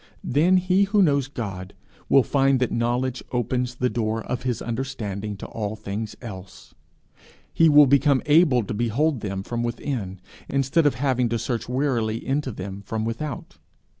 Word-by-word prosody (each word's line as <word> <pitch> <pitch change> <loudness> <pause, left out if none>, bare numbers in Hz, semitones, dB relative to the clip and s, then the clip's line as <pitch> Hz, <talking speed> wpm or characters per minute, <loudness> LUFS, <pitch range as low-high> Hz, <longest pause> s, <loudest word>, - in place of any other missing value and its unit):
Then 165 +8 +3
he 185 +2 +3
who 200 0 +3
knows 140 -5 +2
God, 100 -8 -6 0.3
will 135 - +6
find 135 -1 +2
that 125 - 0
knowledge 120 +2 -1
open 125 +1 0
the 125 - +2
door 110 -1 -2
of 125 - -3
his 125 -2 -2
understanding 110 -5 -4
to - - -8
all 105 -1 -4
things 105 +1 -5
else. 95 -4 -10 0.8
He 165 -1 +5
will 150 0 +8
become 140 0 +3
able 145 -5 +4
to - - -5
behold 120 +6 0
them 100 -2 -4
from 120 +3 -3
within, 120 -5 -4 0.3
instead 140 +3 +2
of 145 - +1
having 125 -3 +1
to 115 - 0
search 115 0 -3
wearily 125 -4 0
into 135 0 -1
them 100 -1 -7
from 110 +2 -3
without. 115 +2 -5
125 Hz, 165 wpm, -24 LUFS, 110-140 Hz, 0.8 s, will